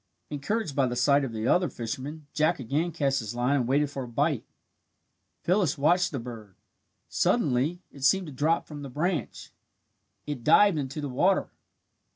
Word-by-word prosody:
Encouraged 150 Hz, +3 st, -2 dB
by 135 Hz, -2 st, +3 dB
the 120 Hz, -, -3 dB
sight 140 Hz, +3 st, +3 dB
of 135 Hz, -, -3 dB
the 110 Hz, +1 st, -3 dB
other 180 Hz, +5 st, +3 dB
fisherman, 135 Hz, +7 st, -6 dB
Jack 155 Hz, +2 st, +2 dB
again 145 Hz, +8 st, -1 dB
cast 140 Hz, -4 st, 0 dB
his 110 Hz, -1 st, -5 dB
line 125 Hz, +4 st, +1 dB
and 125 Hz, -4 st, 0 dB
waited 145 Hz, +2 st, +2 dB
for 135 Hz, -, -5 dB
a 125 Hz, -, -5 dB
bite. 120 Hz, -, 0 dB, 1.0 s
Phyllis 180 Hz, -4 st, +2 dB
watched 175 Hz, +6 st, +3 dB
the 140 Hz, -, -3 dB
bird. 115 Hz, -5 st, -9 dB, 0.5 s
Suddenly 170 Hz, -, +1 dB
it 140 Hz, -, -11 dB
seemed 190 Hz, +7 st, +4 dB
to 150 Hz, -, -8 dB
drop 155 Hz, +5 st, +1 dB
from 150 Hz, -2 st, -9 dB
the 140 Hz, -, -7 dB
branch. 155 Hz, -, -3 dB, 0.7 s
It 145 Hz, -5 st, -5 dB
dived 200 Hz, -, +5 dB
into 140 Hz, +2 st, -4 dB
the 145 Hz, -, -3 dB
water. 180 Hz, +10 st, +1 dB
145 Hz, 175 wpm, -27 LUFS, 125-165 Hz, 1.0 s, dived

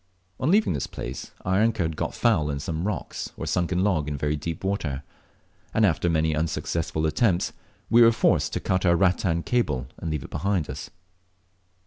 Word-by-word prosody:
On 130 Hz, -, +1 dB
leaving 210 Hz, -, +4 dB
this 70 Hz, -4 st, -2 dB
place -, -, -6 dB, 0.2 s
our 95 Hz, +1 st, +2 dB
anchor 115 Hz, -4 st, +2 dB
had 80 Hz, -1 st, -2 dB
got -, -, -3 dB
foul 85 Hz, -11 st, +2 dB
in 70 Hz, -1 st, -2 dB
some 80 Hz, +5 st, -3 dB
rock 105 Hz, -6 st, -4 dB, 0.2 s
or -, -, -4 dB
sunken 90 Hz, +1 st, 0 dB
log 85 Hz, -8 st, +1 dB
in 75 Hz, -1 st, -2 dB
very 75 Hz, +2 st, 0 dB
deep 80 Hz, +3 st, -5 dB
water, 85 Hz, -8 st, -2 dB, 0.7 s
and 110 Hz, -, +5 dB
after 85 Hz, -1 st, +1 dB
many 80 Hz, -1 st, +2 dB
unsuccessful 80 Hz, 0 st, -1 dB
attempts, 85 Hz, +4 st, +1 dB, 0.3 s
we 120 Hz, +1 st, +5 dB
were 115 Hz, 0 st, +8 dB
forced 115 Hz, -, +2 dB
to -, -, 0 dB
cut 95 Hz, 0 st, 0 dB
our 85 Hz, -2 st, +4 dB
rattan 90 Hz, -2 st, +2 dB
cable 75 Hz, -, 0 dB
and 85 Hz, -, -5 dB
leave 75 Hz, -3 st, -2 dB
it -, -, -11 dB
behind 95 Hz, -5 st, -1 dB
us. -, -, -7 dB
85 Hz, 185 wpm, -25 LUFS, 75-100 Hz, 0.7 s, were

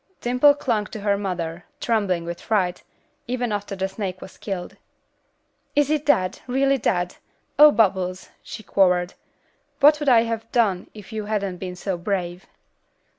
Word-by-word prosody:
Dimple 250 Hz, +4 st, +4 dB
clung 230 Hz, -8 st, -1 dB
to 215 Hz, -, -8 dB
her 200 Hz, 0 st, +2 dB
mother, 175 Hz, -4 st, -4 dB, 0.2 s
trembling 200 Hz, -7 st, 0 dB
with 170 Hz, 0 st, -6 dB
fright, 185 Hz, -5 st, 0 dB, 0.5 s
even 245 Hz, -1 st, -2 dB
after 205 Hz, -1 st, -3 dB
the 190 Hz, 0 st, -1 dB
snake 190 Hz, -2 st, -5 dB
was 190 Hz, -, -12 dB
killed. 190 Hz, -4 st, -5 dB, 1.0 s
"Is 290 Hz, 0 st, +3 dB
it 300 Hz, -1 st, 0 dB
dead, 185 Hz, -10 st, +2 dB
really 270 Hz, +2 st, +2 dB
dead? 180 Hz, -4 st, -1 dB, 0.4 s
Oh, 300 Hz, 0 st, +10 dB
Bubbles!" 190 Hz, -5 st, +1 dB
she 220 Hz, -, -9 dB
quavered. 180 Hz, -2 st, +2 dB, 0.7 s
"What 295 Hz, +1 st, +6 dB
would 295 Hz, -2 st, +1 dB
I 235 Hz, -3 st, +6 dB
have 230 Hz, -1 st, -4 dB
done 200 Hz, -7 st, +1 dB
if 210 Hz, +1 st, -11 dB
you 215 Hz, -1 st, -3 dB
hadn't 200 Hz, -3 st, -2 dB
been 180 Hz, 0 st, -6 dB
so 180 Hz, 0 st, -3 dB
brave?" 180 Hz, -1 st, -3 dB
200 Hz, 155 wpm, -23 LUFS, 185-235 Hz, 1.0 s, Oh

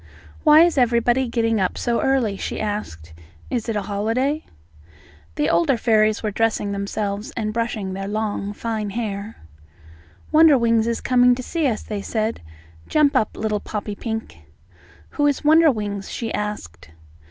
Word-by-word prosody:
"Why 305 Hz, 0 st, +7 dB
is 340 Hz, -5 st, +2 dB
everybody 240 Hz, +1 st, +2 dB
getting 225 Hz, -3 st, 0 dB
up 185 Hz, -, -1 dB
so 235 Hz, -1 st, 0 dB
early?" 255 Hz, -7 st, +1 dB
she -, -, -5 dB
asked. 145 Hz, -, -5 dB, 0.4 s
"Is 235 Hz, -2 st, -2 dB
it 225 Hz, -, -1 dB
a 205 Hz, -, -1 dB
holiday?" 225 Hz, +9 st, -1 dB, 0.9 s
The 150 Hz, -, 0 dB
older 170 Hz, +9 st, +2 dB
fairies 215 Hz, -1 st, +2 dB
were 215 Hz, -, -1 dB
dressing 215 Hz, -1 st, 0 dB
themselves 200 Hz, +1 st, -3 dB
and 215 Hz, -2 st, -2 dB
brushing 220 Hz, -4 st, -2 dB
their 195 Hz, +1 st, -5 dB
long 205 Hz, -1 st, -2 dB
fine 220 Hz, -1 st, -3 dB
hair. 210 Hz, -1 st, -4 dB, 1.0 s
"Wonderwings 245 Hz, -8 st, +5 dB
is 235 Hz, -1 st, -1 dB
coming 250 Hz, -1 st, +4 dB
to 255 Hz, -, -6 dB
see 325 Hz, +2 st, -1 dB
us," 230 Hz, -4 st, -2 dB
they 210 Hz, -2 st, -5 dB
said. 220 Hz, +2 st, -2 dB, 0.5 s
"Jump 300 Hz, -2 st, +3 dB
up, 220 Hz, -4 st, +1 dB
little 215 Hz, -1 st, -1 dB
Poppypink." 215 Hz, -, -5 dB, 0.7 s
"Who 290 Hz, -1 st, +1 dB
is 285 Hz, -, 0 dB
Wonderwings?" 235 Hz, -11 st, +3 dB
she 230 Hz, -2 st, -4 dB
asked. 145 Hz, -, -5 dB
220 Hz, 145 wpm, -22 LUFS, 205-245 Hz, 1.0 s, Why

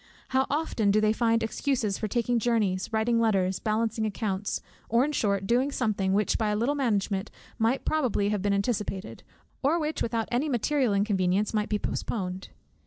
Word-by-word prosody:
How 265 Hz, 0 st, +2 dB
often 285 Hz, -8 st, 0 dB
do 205 Hz, +2 st, +4 dB
they 215 Hz, 0 st, +3 dB
find 230 Hz, 0 st, +2 dB
excuses 225 Hz, -3 st, -1 dB
for 215 Hz, -, -1 dB
taking 240 Hz, +2 st, 0 dB
journeys, 210 Hz, -5 st, 0 dB
writing 230 Hz, +1 st, +2 dB
letters, 195 Hz, -5 st, +1 dB
balancing 220 Hz, 0 st, 0 dB
accounts; 205 Hz, -2 st, -2 dB, 0.3 s
or 235 Hz, +4 st, +4 dB
in 300 Hz, -, -2 dB
short 200 Hz, -8 st, 0 dB
doing 250 Hz, +6 st, +2 dB
something, 210 Hz, -7 st, 0 dB
which 205 Hz, +2 st, +1 dB
by 220 Hz, -2 st, +1 dB
a 210 Hz, -, +1 dB
little 235 Hz, +7 st, +1 dB
management 210 Hz, -7 st, 0 dB, 0.3 s
might 230 Hz, +4 st, +1 dB
probably 250 Hz, -10 st, +1 dB
have 210 Hz, -2 st, -1 dB
been 200 Hz, +1 st, +1 dB
anticipated, 200 Hz, -1 st, -2 dB, 0.4 s
or 290 Hz, +5 st, +2 dB
which, 310 Hz, 0 st, -2 dB
without 225 Hz, -1 st, -1 dB
any 260 Hz, +6 st, +1 dB
material 255 Hz, -2 st, +1 dB
inconvenience, 200 Hz, 0 st, +1 dB
might 210 Hz, -1 st, 0 dB
be 210 Hz, -, +1 dB
postponed! 190 Hz, -3 st, -4 dB
220 Hz, 175 wpm, -27 LUFS, 200-240 Hz, 0.4 s, do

